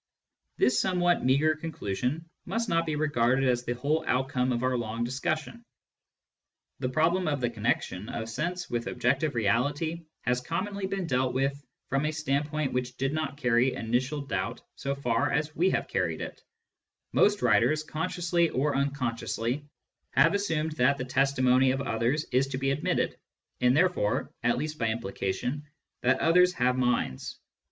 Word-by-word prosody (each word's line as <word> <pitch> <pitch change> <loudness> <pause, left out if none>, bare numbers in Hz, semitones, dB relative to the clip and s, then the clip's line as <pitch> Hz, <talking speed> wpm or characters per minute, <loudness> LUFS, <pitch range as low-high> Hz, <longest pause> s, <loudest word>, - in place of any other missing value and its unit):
This 125 - +3
somewhat 175 -2 +2
meagre 140 +5 +3
conclusion 150 0 -3 0.2
must 230 0 -1
not 165 0 +1
be 155 - 0
regarded 135 -3 +2
as 120 -1 +1
the 120 - -1
whole 150 +6 0
outcome 130 0 +1
of 120 0 -1
our 130 0 +1
long 115 -1 -2
discussion. 155 - -3 1.2
The 125 - -1
problem 165 +7 +2
of 145 -2 0
the 120 -1 0
connection 110 -3 -1
of 110 - -4
sense 175 +10 -3
with 120 -1 -3
objective 140 +1 0
reality 145 +10 0 0.2
has 125 +1 0
conimonly 190 +7 -3
been 195 -2 -2
dealt 130 -4 0
with 140 +2 0 0.3
from 135 +2 +1
a - - 0
standpoint 150 -1 -1
which 125 0 -2
did 135 +2 -1
not 150 -3 -2
carry 125 -1 +2
initial 130 +6 -1
doubt 115 -3 -3
so 140 0 -3
far 120 -4 0
as 150 +1 -1
we 180 +4 +3
have - - -1
carried - - -1
it; - - -7 0.7
most 205 -1 +3
writers, 125 +7 +3
consciously 170 +2 0
or 140 +3 0
unconsciously, 135 -1 -2 0.5
have 155 +5 +5
assumed 160 -6 0
that 140 +2 +3
the 125 - -3
testimony 130 0 +3
of 135 +1 0
others 120 +4 0
is 130 +2 +3
to 135 -1 -4
be 135 +1 0
admitted, 140 +2 0 0.4
and 125 +2 +4
there 180 +3 +6
fore 130 - -1
(at 120 +1 +2
least 155 +3 -4
by 115 - +1
implication) 115 +4 -2 0.4
that 130 +1 +3
others 180 +2 +5
have 125 -4 +2
minds. 125 - -1
135 Hz, 160 wpm, -28 LUFS, 125-155 Hz, 1.2 s, there